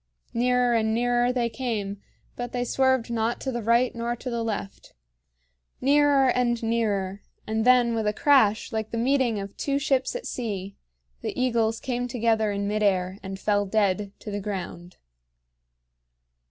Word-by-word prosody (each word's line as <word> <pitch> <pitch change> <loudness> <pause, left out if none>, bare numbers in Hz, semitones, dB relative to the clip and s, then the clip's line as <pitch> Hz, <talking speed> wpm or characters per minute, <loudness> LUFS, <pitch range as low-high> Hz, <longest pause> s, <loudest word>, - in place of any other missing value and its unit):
Nearer 250 0 +2
and 220 -1 +1
nearer 245 +1 +2
they 245 -2 0
came, 215 -4 -4 0.3
but 245 0 -5
they 245 -1 0
swerved 260 -2 +1
not 230 0 -1
to 265 - -2
the 240 -1 -3
right 235 +3 +2
nor 235 0 -2
to 250 +1 -6
the 235 -1 -2
left. 210 -3 -5 0.9
Nearer 280 0 +4
and 240 -2 +1
nearer 205 -4 -1 0.2
and 220 +1 -1
then 245 -2 +5
with 220 -2 -1
a - - +3
crash 240 -5 +3
like 220 -1 -3
the 230 - -4
meeting 245 -2 +1
of 200 0 -7
two 280 -1 0
ships 270 - 0
at - - -5
sea, 200 -5 -4 0.5
the - - -4
eagles 230 -3 +1
came 245 -1 -2
together 225 -3 +1
in 200 0 -2
mid 210 +1 -1
air 190 -1 +1
and 190 0 -7
fell 205 0 +1
dead 200 -1 +1
to 210 - -7
the 205 - -2
ground. 180 -3 -6
230 Hz, 165 wpm, -25 LUFS, 205-250 Hz, 0.9 s, then